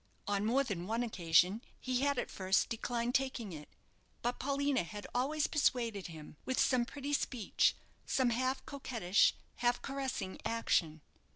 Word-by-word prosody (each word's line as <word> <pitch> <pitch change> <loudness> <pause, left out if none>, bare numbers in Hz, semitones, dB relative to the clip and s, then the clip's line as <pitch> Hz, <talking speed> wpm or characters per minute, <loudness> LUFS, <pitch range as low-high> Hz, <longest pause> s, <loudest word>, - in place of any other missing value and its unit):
On 200 0 0
more 265 +5 +3
than 185 -8 -4
one 230 +3 0
occasion 185 -1 +3 0.2
he 255 0 -1
had 280 -1 +2
at - - -2
first 190 0 +1
declined 235 +1 -1
taking 260 -7 -1
it; 150 -1 -9 0.5
but 240 +1 -1
Paulina 280 0 +1
had 205 +4 -7
always 290 +5 +1
persuaded 235 - +1
him, 155 -3 -10
with 260 - -1
some 250 -2 +3
pretty 285 +2 -5
speech, 250 -6 +2 0.3
some 255 -2 +2
half 255 +3 0
coquettish, 230 -9 +2 0.2
half 240 0 +2
caressing 270 -8 -3
action. 165 -9 +1
240 Hz, 150 wpm, -34 LUFS, 200-265 Hz, 0.5 s, more